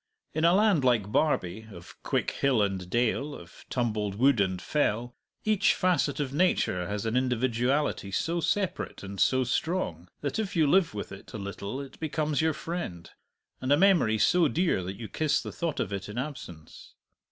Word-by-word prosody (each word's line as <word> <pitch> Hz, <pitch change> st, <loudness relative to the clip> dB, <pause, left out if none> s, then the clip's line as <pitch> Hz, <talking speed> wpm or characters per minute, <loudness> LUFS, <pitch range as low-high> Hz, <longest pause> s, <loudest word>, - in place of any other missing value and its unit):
In 155 Hz, -, -1 dB
a 170 Hz, +2 st, +5 dB
land 200 Hz, -8 st, +4 dB
like 115 Hz, -5 st, +2 dB
Barbie, 110 Hz, -, 0 dB
of 85 Hz, -2 st, -12 dB
quick -, -, -1 dB
hill 130 Hz, -6 st, +2 dB
and 95 Hz, -3 st, -3 dB
dale, 125 Hz, +6 st, 0 dB
of -, -, -13 dB
tumbled 105 Hz, -5 st, -1 dB
wood 125 Hz, 0 st, +4 dB
and 95 Hz, -2 st, 0 dB
fell, 120 Hz, -, -1 dB, 0.3 s
each 215 Hz, -2 st, +3 dB
facet 180 Hz, -6 st, +1 dB
of 140 Hz, -2 st, -2 dB
nature 140 Hz, -, +1 dB
has 105 Hz, +2 st, -3 dB
an 110 Hz, +1 st, -1 dB
individuality 125 Hz, -1 st, 0 dB
so 165 Hz, -, -1 dB
separate 190 Hz, -, -2 dB
and 100 Hz, 0 st, -7 dB
so 130 Hz, 0 st, +3 dB
strong 120 Hz, -, -2 dB
that 145 Hz, +9 st, -2 dB
if 205 Hz, -3 st, -3 dB
you 160 Hz, -2 st, +4 dB
live 170 Hz, -, +3 dB
with 100 Hz, -, -5 dB
it 95 Hz, -, -11 dB
a -, -, -4 dB
little 100 Hz, +4 st, -5 dB
it 140 Hz, -1 st, -9 dB
becomes 155 Hz, -2 st, -1 dB
your 160 Hz, 0 st, +2 dB
friend, 155 Hz, -, -5 dB, 0.5 s
and 130 Hz, +1 st, -1 dB
a 145 Hz, -, +6 dB
memory 170 Hz, -, +4 dB
so 175 Hz, -, +4 dB
dear 165 Hz, -, +1 dB
that 95 Hz, +2 st, -6 dB
you 115 Hz, -, -6 dB
kiss 155 Hz, +4 st, +1 dB
the -, -, -6 dB
thought 165 Hz, -4 st, -3 dB
of -, -, -2 dB
it 100 Hz, 0 st, -5 dB
in 105 Hz, -, -7 dB
absence. 125 Hz, -, -7 dB
130 Hz, 185 wpm, -28 LUFS, 100-155 Hz, 0.5 s, a